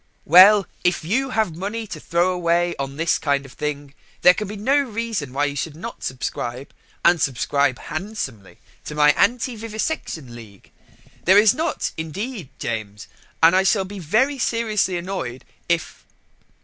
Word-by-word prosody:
Well, 190 +5 +8 0.2
if 180 -2 +1
you 265 +10 0
have 220 -9 0
money 205 +6 -4
to - - -8
throw 175 +2 +1
away 175 0 +1
on 135 0 -4
this 165 +1 +1
kind 140 -2 0
of 135 - -13
thing, 145 -2 -5 0.3
there 180 - +8
can 210 +2 -4
be 210 - -6
no 220 +8 +1
reason 230 - -3
why 140 +3 0
you 140 -1 -3
should 145 +2 -4
not 230 +9 -8
subscribe 125 0 -4 0.3
and 170 -2 +5
subscribe 135 0 +1
handsomely 155 - -6 0.3
to 150 - -6
my 150 0 +6
anti 245 - +1
Vivisection 215 - -4
League. 105 -5 -14 0.5
There 190 +3 +6
is 210 0 +6
not, 320 +1 -2
indeed, 185 - -5
James, 105 -3 -5 0.4
and 165 +3 +7
I 190 - +5
shall 190 0 +2
be 200 +1 -8
very 245 - +1
seriously 215 -6 0
annoyed 170 -9 -5 0.2
if 170 -2 -1
175 Hz, 160 wpm, -22 LUFS, 145-215 Hz, 0.5 s, Well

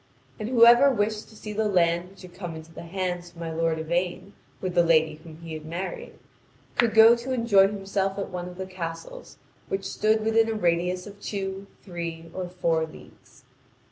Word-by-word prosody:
And 215 +1 -3
whoever 240 +2 +7
wished 215 -3 -1
to 220 - -16
see 210 0 -7
the 215 +1 0
land 175 -2 +2
which 195 -1 -16
had 180 -1 -12
come 175 -4 -6
into 160 +1 -11
the - - -8
hands 175 0 -3
of 175 - -21
my 165 -1 -5
lord 165 0 0
Yvain 175 +4 -2 0.3
with 185 -2 -3
the 175 - +5
lady 160 -2 +3
whom 160 -2 -11
he 165 -1 -7
had 155 -1 -6
married, 175 +4 -6 0.6
could 230 -3 +2
go 225 +1 +9
to 240 +2 -6
enjoy 230 -6 +5
himself 195 -1 -2
at 200 - -4
one 180 0 -5
of 180 - -12
the 190 - -4
castles 185 - -7 0.3
which 195 0 -2
stood 215 +2 +1
within 225 0 +3
a 225 - -1
radius 180 -1 0
of 205 0 -12
two, 195 -1 -4 0.2
three, 165 -3 -6
or 185 -1 -4
four 170 -3 0
leagues. 155 - -17
185 Hz, 195 wpm, -26 LUFS, 170-210 Hz, 0.6 s, go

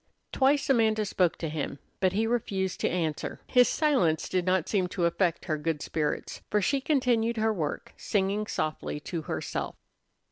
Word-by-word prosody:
Twice 280 +1 +3
Amanda 220 -4 +3
spoke 180 -3 +1
to 165 - -3
him, 150 -2 -3 0.2
but 185 -1 +2
he 215 +3 +1
refused 200 -5 -1
to - - +1
answer. 160 -4 -2
His 250 -1 +5
silence 195 - +2
did 185 -1 0
not 185 -2 +2
seem 190 -4 +1
to 180 -1 -1
affect 170 0 +1
her 155 -3 -1
good 155 0 -2
spirits, 150 -2 -2
for 210 - +2
she 270 +7 +1
continued 245 -5 +1
her 220 0 +2
work, 155 -7 -4
singing 205 +1 0
softly 155 -4 -2
to 165 +1 -4
herself. - - -4
190 Hz, 170 wpm, -28 LUFS, 165-225 Hz, 0.2 s, His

